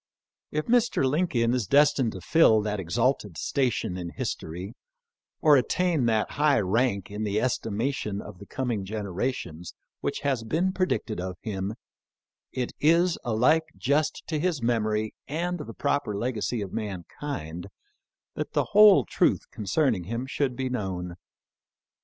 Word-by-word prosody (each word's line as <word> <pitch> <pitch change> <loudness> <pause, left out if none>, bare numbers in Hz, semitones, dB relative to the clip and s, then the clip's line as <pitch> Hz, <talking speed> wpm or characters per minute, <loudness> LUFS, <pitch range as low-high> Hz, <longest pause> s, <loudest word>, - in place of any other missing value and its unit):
If 155 0 -2
Mr. 240 - +2
Lincoln 130 -6 +1
is 125 -6 0
destined 140 -3 +4
to 95 - -8
fill 110 - +5
that 105 -1 -2
exalted 105 - 0
station 120 - -1
in 90 -1 -5
history 90 +5 -5 0.7
or 150 -3 +7
attain 160 0 +1
that 110 -2 +1
high 145 -3 +3
rank 100 0 0
in 105 +1 -4
the 105 0 0
estimation 110 -2 -1
of 105 -3 -10
the 100 - -11
coming 120 -7 -2
generations 95 -3 -4 0.2
which - - -3
has 135 -5 0
been 170 +11 0
predicted 185 - -1
of 90 -1 -5
him, 100 -1 -3 0.8
it 125 -2 -3
is 170 +3 +3
alike 125 +8 +3
just 145 +4 0
to 155 -2 -2
his 170 -2 0
mem 115 -2 +1
ory 110 0 -1
and 175 +4 -2
the 145 -6 -6
proper 140 -8 -1
legacy 120 0 -2
of 95 - -8
mankind 90 - -5 0.7
that - - -5
the - - +2
whole 205 - +8
truth - - +1
concerning 105 - 0
him 115 +6 -3
should 135 -1 -1
be 130 +1 -2
known. 95 -7 -3
115 Hz, 145 wpm, -27 LUFS, 100-145 Hz, 0.8 s, whole